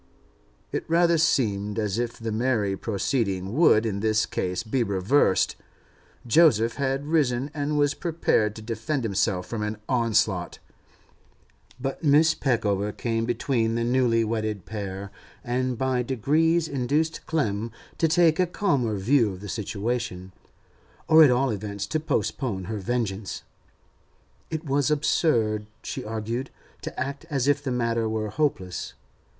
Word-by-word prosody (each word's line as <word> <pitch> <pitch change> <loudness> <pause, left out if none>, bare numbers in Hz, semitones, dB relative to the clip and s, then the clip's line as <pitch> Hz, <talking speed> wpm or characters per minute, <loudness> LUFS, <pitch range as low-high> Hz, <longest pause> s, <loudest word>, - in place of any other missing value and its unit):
It - - -2
rather 170 0 +4
seemed 105 -10 +1
as 105 -1 -1
if 120 -1 -3
the 115 -1 -4
merry 110 -3 0
proceeding 100 -2 -1
would 120 -7 +5
in 100 -3 -2
this 110 0 +2
case 90 0 -2
be 120 +3 -1
reversed; 100 +2 +2 0.7
Joseph 120 -4 +4
had 135 0 -1
risen, 140 -4 +1
and 150 0 -1
was 145 0 +3
prepared 155 - 0
to 110 - -9
defend 115 +5 -2
himself 100 -3 0
from 110 +3 -4
an 105 0 -3
onslaught. 110 -7 +1 1.2
But 135 +1 -4
Mrs. 155 +1 +4
Peckover 105 -5 0
came 115 +1 -2
between 115 -1 0
the 115 - 0
newly 120 -1 +2
wedded 110 -3 -2
pair, 100 -2 -6 0.3
and 125 0 -1
by 130 0 0
degrees 155 +7 +1
induced 145 +4 -1
Clem 115 -8 -1 0.3
to 165 - +4
take 165 0 +3
a 180 - +3
calmer 140 - 0
view 115 +2 +2
of 90 - -10
the 100 - -7
situation, 105 -3 -3 0.7
or 160 0 +8
at 150 - +7
all 125 +1 +2
events 100 -1 -4
to 155 - -1
postpone 125 -9 -2
her 110 +4 -4
vengeance. 100 -2 -3 1.1
It 160 +1 -4
was 140 -1 +1
absurd, 115 -8 +1 0.2
she - - -5
argued, 115 +4 -4 0.3
to - - -6
act 140 +4 -4
as 140 -3 0
if 145 0 +3
the 145 - -3
matter 115 -2 0
were 110 -1 -2
hopeless. 110 -12 -2
115 Hz, 140 wpm, -25 LUFS, 105-140 Hz, 1.2 s, or